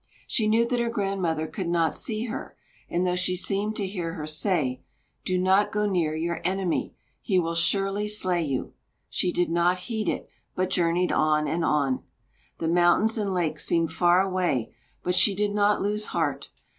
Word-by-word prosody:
She 220 - 0
knew 230 +2 +3
that 245 0 0
her 235 0 0
grandmother 195 -8 -1
could 165 +3 -5
not 165 -2 +2
see 220 0 -1
her, 235 +1 -6 0.3
and 175 +1 0
though 180 0 +1
she 180 0 +1
seemed 200 +3 0
to 205 - -2
hear 180 -4 -4
her 155 -3 -5
say: 155 -5 0 0.4
"Do 185 - 0
not 190 +3 +3
go 210 0 0
near 170 -6 0
your 170 +2 -2
enemy; 185 -2 -1 0.3
he 195 -5 0
will 165 -2 +1
surely 195 +4 +1
slay 185 -4 +1
you," 135 -4 -3 0.4
she 180 - 0
did 175 -1 0
not 175 +2 +2
heed 220 +3 -3
it, - - -3 0.3
but 185 0 -1
journeyed 175 0 +1
on 155 0 +2
and 165 +1 -1
on. 140 -5 +1 0.6
The 165 - -2
mountains 175 +6 +3
and 200 -2 -1
lakes 160 -4 -1
seemed 165 -1 +1
far 175 +1 +4
away; 180 -11 -1 0.3
but 180 - 0
she 190 +2 +4
did 205 +1 0
not 205 0 +2
lose 210 +1 -1
heart. 160 -5 -2
180 Hz, 180 wpm, -26 LUFS, 165-205 Hz, 0.6 s, far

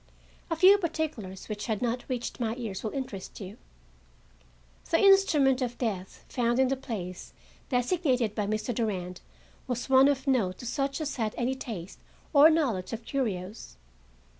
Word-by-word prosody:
A 330 - 0
few 380 +5 +7
particulars 310 - -4
which 210 -1 -5
had 220 -3 -1
not 245 0 -2
reached 245 -1 -3
my 225 -2 -1
ears 220 -6 -5
will 220 - -1
interest 225 -7 -6
you. 200 +1 -8 1.3
The 330 - +4
instrument 320 -10 +5
of 245 -1 -2
death 195 -6 -4
found 240 -1 0
in 260 -1 +3
the 270 - +1
place 205 -9 -6 0.4
designated 250 - +1
by 210 -2 -2
Mr. 215 +3 -1
Durand 185 -6 -3 0.5
was 245 0 -3
one 265 +1 +7
of 275 -1 0
note 225 -10 +1
to - - -9
such 275 +5 -2
as 295 -3 -3
had 220 -3 -1
any 250 +2 0
taste 215 -9 -7 0.3
or 295 +2 +8
knowledge 245 - 0
of 225 0 -6
curios. 205 - -3
245 Hz, 160 wpm, -28 LUFS, 210-275 Hz, 1.3 s, or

